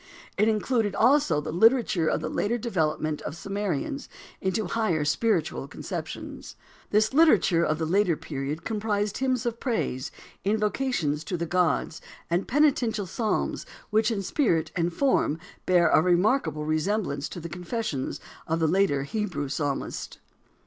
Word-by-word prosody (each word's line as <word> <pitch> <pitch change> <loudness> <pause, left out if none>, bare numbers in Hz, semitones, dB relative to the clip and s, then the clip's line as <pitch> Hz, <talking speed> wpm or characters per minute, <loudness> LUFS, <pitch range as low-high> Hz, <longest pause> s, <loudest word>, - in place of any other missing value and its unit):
It 210 +2 +3
included 220 -1 +1
also 245 - +4
the 150 - -4
literature 220 -3 +3
of - - +1
the - - -2
later 235 +4 0
development 155 -9 -1
of - - -5
the - - -10
Sumerians 200 - -3 0.3
into 190 +3 0
higher 175 -7 0
spiritual 165 -4 0
conceptions. - - -7 0.3
This 215 +3 +2
literature 220 - +5
of 155 -2 +1
the 160 - -1
later 180 -1 +2
period 145 +2 -4
comprised 210 -2 -1
hymns 255 -3 0
of 235 -1 -2
praise, 215 - -2 0.3
invocations 210 - 0
to 180 - -2
the 170 - -2
gods, 170 -1 0 0.3
and 175 +3 +1
penitential 250 -7 +2
psalms 215 +4 -1 0.3
which 215 +1 +3
in 205 -4 -2
spirit 165 - +1
and 170 -1 +1
form 215 - +1 0.3
bear 175 -2 +5
a 155 - +5
remarkable 175 - +2
resemblance 155 -2 -1
to - - -7
the 170 - -6
confessions 175 - -3 0.3
of 160 +1 0
the 160 - +2
later 160 -5 +2
Hebrew 185 -5 -3
psalmist. 145 -1 -3
190 Hz, 145 wpm, -26 LUFS, 160-220 Hz, 0.3 s, literature